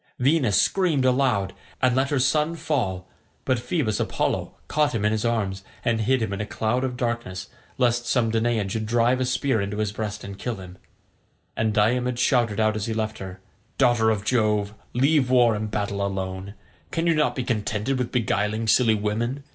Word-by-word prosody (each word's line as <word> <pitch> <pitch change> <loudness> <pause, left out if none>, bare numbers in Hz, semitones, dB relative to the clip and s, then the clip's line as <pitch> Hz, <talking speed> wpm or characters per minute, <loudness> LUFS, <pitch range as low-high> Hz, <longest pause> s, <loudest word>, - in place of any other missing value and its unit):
Venus 130 - +3
screamed 165 -9 +2
aloud, 125 -7 +2 0.3
and 130 -2 +2
let 135 +1 +1
her 145 - +1
son 150 +5 +2
fall, 95 - -2 0.4
but 130 -2 +1
Phoebus 120 -5 -1
Apollo - - -1
caught 150 -4 +1
him 105 -2 0
in 105 - +3
his 110 -1 -1
arms, 100 -5 -1 0.2
and 115 -1 +1
hid 125 +2 +2
him 100 - -2
in 100 - -3
a - - -2
cloud 115 +4 -1
of 125 -2 -2
darkness, 120 -7 -3 0.3
lest 120 -1 +1
some 120 -2 +2
Danaan 115 -2 +1
should 110 +2 -3
drive 120 +3 +2
a - - +2
spear 130 -2 0
into 100 +1 -3
his 105 -1 -1
breast 105 -1 -5
and 100 0 -8
kill 120 -2 -3
him; 95 -2 -11 0.8
and 110 -1 +1
Diomed 120 +4 +1
shouted 120 -4 +2
out 110 -1 +2
as 110 0 -3
he 110 - -2
left 110 0 -2
her, 95 -1 -8 0.4
"Daughter 120 -4 +4
of 105 -2 -1
Jove, 105 -4 +1 0.2
leave 135 +1 +3
war 120 -3 +5
and 105 0 -3
battle 100 -1 -2
alone, 95 0 -4 0.3
can 165 - -1
you 170 - +4
not 155 -1 +1
be 130 - -2
contented 110 +2 -1
with 125 - -2
beguiling 110 -1 0
silly 115 -1 +4
women? 115 +6 -2
115 Hz, 190 wpm, -24 LUFS, 105-125 Hz, 0.8 s, war